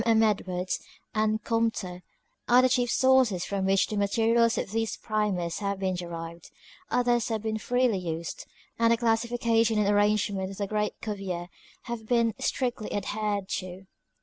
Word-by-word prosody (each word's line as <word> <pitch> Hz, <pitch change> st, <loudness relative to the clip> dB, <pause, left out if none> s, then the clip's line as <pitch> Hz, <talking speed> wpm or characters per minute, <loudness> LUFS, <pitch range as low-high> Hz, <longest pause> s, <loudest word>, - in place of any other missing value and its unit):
M. 225 Hz, -1 st, +4 dB
Bklwards 190 Hz, -4 st, 0 dB, 0.3 s
and 215 Hz, 0 st, +1 dB
Comte 230 Hz, -2 st, 0 dB, 0.7 s
are 245 Hz, +1 st, +7 dB
the 255 Hz, -, +4 dB
chief 245 Hz, -1 st, +2 dB
sooroet 260 Hz, -10 st, +3 dB
from 195 Hz, -1 st, -1 dB
which 195 Hz, 0 st, +4 dB
the 215 Hz, -, -5 dB
materials 230 Hz, +3 st, +3 dB
of -, -, -3 dB
these 225 Hz, 0 st, -1 dB
Primers 200 Hz, -6 st, -1 dB
have 200 Hz, -1 st, -2 dB
been 190 Hz, -1 st, -1 dB
derived, 170 Hz, -1 st, -7 dB, 0.4 s
others 240 Hz, -2 st, +2 dB
have 220 Hz, -2 st, -2 dB
been 220 Hz, 0 st, -2 dB
freely 245 Hz, -3 st, +1 dB
used, 165 Hz, -2 st, -5 dB, 0.3 s
and 230 Hz, 0 st, +4 dB
the 230 Hz, -, +4 dB
classification 230 Hz, -1 st, +2 dB
and 210 Hz, -1 st, +2 dB
arrangement 205 Hz, -2 st, +2 dB
of 195 Hz, -, -9 dB
the 200 Hz, -, -1 dB
great 210 Hz, +1 st, -2 dB
Cuvier, 190 Hz, -5 st, -4 dB, 0.3 s
have 235 Hz, -3 st, -6 dB
been 235 Hz, -2 st, +2 dB
strictly 245 Hz, -4 st, -2 dB
adhered 205 Hz, -1 st, -2 dB
to. 185 Hz, +1 st, -9 dB
215 Hz, 155 wpm, -27 LUFS, 195-230 Hz, 0.7 s, are